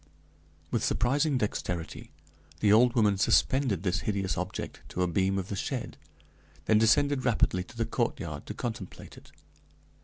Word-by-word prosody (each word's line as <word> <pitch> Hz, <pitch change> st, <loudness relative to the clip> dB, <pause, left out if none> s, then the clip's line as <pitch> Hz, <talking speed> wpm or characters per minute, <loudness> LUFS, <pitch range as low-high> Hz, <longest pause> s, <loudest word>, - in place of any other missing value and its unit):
With -, -, 0 dB
surprising 140 Hz, +4 st, +1 dB
dexterity 90 Hz, -6 st, -3 dB, 0.5 s
the 105 Hz, -1 st, +4 dB
old 120 Hz, +3 st, +5 dB
woman 105 Hz, -4 st, +3 dB
suspended 125 Hz, -, +2 dB
this 95 Hz, 0 st, 0 dB
hideous 95 Hz, -5 st, -1 dB
object 90 Hz, +2 st, -5 dB
to 90 Hz, -, -1 dB
a -, -, +1 dB
beam 95 Hz, +3 st, +1 dB
of 95 Hz, -1 st, -4 dB
the 100 Hz, -, -3 dB
shed, -, -, -4 dB, 0.7 s
then 110 Hz, -1 st, +4 dB
descended 130 Hz, +5 st, +3 dB
rapidly 105 Hz, -6 st, +1 dB
to 115 Hz, -, -15 dB
the 115 Hz, -, 0 dB
courtyard 115 Hz, -, -3 dB
to -, -, -6 dB
contemplate 110 Hz, -6 st, -6 dB
it. -, -, -16 dB
105 Hz, 150 wpm, -29 LUFS, 95-120 Hz, 0.7 s, old